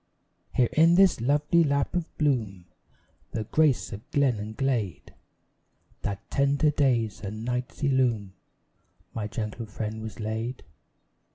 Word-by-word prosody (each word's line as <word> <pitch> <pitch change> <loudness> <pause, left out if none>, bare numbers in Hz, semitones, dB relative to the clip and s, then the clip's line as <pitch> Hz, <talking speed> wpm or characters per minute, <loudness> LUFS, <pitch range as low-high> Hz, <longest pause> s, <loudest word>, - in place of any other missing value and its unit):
Here 125 -2 +3
in 165 +2 +6
this 190 -9 +5
lovely 150 +6 +3
lap 140 -2 0
of 175 -2 -3
bloom, 110 - 0 0.7
The 110 - -1
grace 145 +2 +2
of 100 +2 -9
glen 135 -6 +2
and 110 +1 -6
glade, 120 -9 -2 0.9
That 100 -1 -4
tender 140 +2 +3
days 125 -7 +1
and 110 +2 -5
nights 125 +3 -3
illume, 125 -8 +1 0.8
My 105 -2 -3
gentle 110 +1 -5
friend 110 +1 -5
was 110 +1 -7
laid. 110 +3 -3
120 Hz, 125 wpm, -27 LUFS, 110-140 Hz, 0.9 s, in